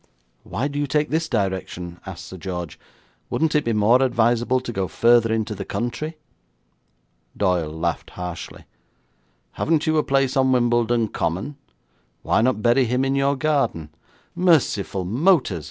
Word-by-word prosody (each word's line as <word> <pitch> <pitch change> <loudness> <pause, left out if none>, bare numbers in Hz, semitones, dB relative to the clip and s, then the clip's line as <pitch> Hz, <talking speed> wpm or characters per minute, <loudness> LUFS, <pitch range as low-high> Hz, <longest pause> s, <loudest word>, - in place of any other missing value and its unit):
'Why 130 - -3
do 145 0 -4
you 145 - -1
take 150 +2 0
this 160 +1 0
direction?' 95 -5 -3
asked 95 -2 -8
Sir 95 - -9
George. 90 -3 -6 0.5
'Wouldn't 160 -1 0
it 150 -1 +2
be 115 - -1
more 110 +4 +4
advisable 120 0 +2
to 125 -1 -6
go 95 -2 -1
further 115 +1 +3
into 110 -1 -1
the 100 -1 -5
country?' 150 +10 -4 1.2
Doyle 90 -5 +1
laughed 80 +2 -3
harshly. 90 -2 -7 0.9
'Haven't 160 -1 0
you 155 -1 +2
a - - +1
place 135 0 +1
on 130 -1 +3
Wimbledon 120 -2 +2
Common? 95 - -3 0.7
Why - - +2
not 120 -3 +1
bury 120 +2 +4
him 125 +3 0
in 135 - 0
your 140 +1 +2
garden?' 135 - -1 0.4
'Merciful 130 - +2
motors!' 130 - +2
120 Hz, 150 wpm, -22 LUFS, 95-140 Hz, 1.2 s, more